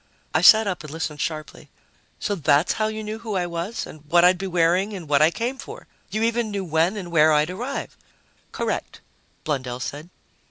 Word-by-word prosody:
I - - +3
sat 220 0 +8
up 185 -6 -3
and 155 - -8
listened 155 -2 -4
sharply. 155 -2 -5 0.5
"So 205 - -1
that's 155 -2 +2
how 215 - 0
you 220 0 -4
knew 215 +1 -5
who 220 -3 -5
I 180 -1 0
was 170 +5 -4
and 155 - -12
what 175 +1 +5
I'd 180 0 +4
be 195 - -3
wearing 180 +3 +2
and 175 -5 -8
what 145 0 +3
I 155 - +6
came 240 +8 -3
for! - - -9 0.2
You 215 +1 -1
even 230 0 0
knew 200 -2 -3
when 165 +5 +1
and 180 -4 -6
where 155 -1 +5
I'd 150 +2 +2
arrive!" 245 +9 -5 0.6
"Correct," - - -3 0.4
Blundell 130 -4 -3
said. 145 +7 -6
175 Hz, 200 wpm, -23 LUFS, 155-215 Hz, 0.6 s, sat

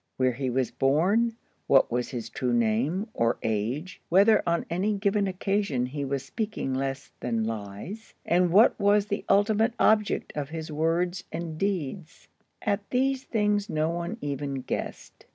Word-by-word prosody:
Where 130 -1 +3
he 130 +2 -3
was 130 0 0
born, 185 +13 +2 0.3
what 135 - +5
was 120 +1 -1
his 120 -4 -5
true 125 +1 -1
name 120 - +1
or 115 0 +1
age, 115 - -2
whether 200 +5 +5
on 170 0 +1
any 195 +5 0
given 200 0 +1
occasion 190 -8 0
he 140 +3 -4
was 135 0 -2
speaking 215 - -3
less 135 +1 -3
than 115 -2 -1
lies, 110 - -6
and 180 +1 +3
what 215 +7 +5
was 205 0 +4
the 205 0 -3
ultimate 215 +3 +3
object 215 -2 +2
of 145 -2 -3
his 160 -1 -6
words 170 +4 0
and 165 -1 -4
deeds,—at 195 +3 -4
these 265 +1 0
things 210 -2 0
no 155 -1 0
one 170 +6 -4
even 140 -1 -3
guessed. - - -6
170 Hz, 150 wpm, -27 LUFS, 135-205 Hz, 0.3 s, what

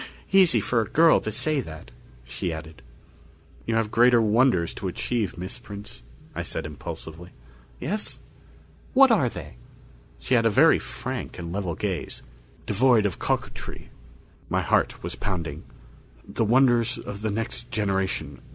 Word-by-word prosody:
"Easy 185 -11 +6
for 115 +3 +1
a 110 - -3
girl 165 +1 +5
to 110 - -3
say 135 +6 +1
that," 80 -8 -10 0.3
she 60 +8 -4
added. 80 -1 -8 0.9
"You 115 - +1
have 110 -1 0
greater 120 0 +5
wonders 110 -5 +3
to 95 - -5
achieve, 105 +2 -2
Miss 95 +7 -6
Prince," 105 - -9 0.3
I - - -3
said - - -4
impulsively. 80 +3 -7 0.5
"Yes? 210 +5 -3 0.8
What 270 -1 +7
are 170 - +3
they?" 75 - -9 0.6
She - - -3
had 115 -2 +5
a - - +4
very 105 - +5
frank - - -6
and 85 -1 -6
level 95 -4 -2
gaze, - - -4 0.4
devoid 115 +1 +3
of 100 - -2
coquetry. - - -4 0.6
My - - +1
heart - - +1
was - - -4
pounding. 85 -5 -4 0.6
"The 115 - -1
wonders 120 0 +3
of 100 0 -7
the 110 - -1
next 115 +3 -3
generation. 95 - -1
105 Hz, 145 wpm, -25 LUFS, 90-125 Hz, 0.9 s, What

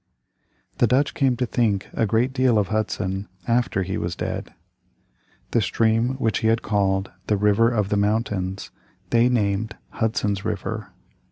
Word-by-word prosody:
The 120 - +5
Dutch 130 +5 +2
came 130 -3 +1
to 125 - 0
think 110 -5 0
a 110 - +1
great 120 +5 +1
deal 130 -4 +3
of 105 -2 +1
Hudson 100 -2 -2 0.2
after 120 -5 +1
he 95 +1 -3
was 85 +1 -3
dead. - - -4 1.0
The 115 - +3
stream 115 +5 +1
which 110 -6 0
he 110 - 0
had 115 +1 +2
called 95 -2 0 0.2
"The 105 - +2
River 105 +3 +4
of 105 -4 0
the 105 - +1
Mountains" 100 -2 -1 0.4
they 120 +1 +4
named 110 -2 0 0.2
Hudson's 105 -3 -1
River. - - -3
110 Hz, 155 wpm, -23 LUFS, 100-120 Hz, 1.0 s, The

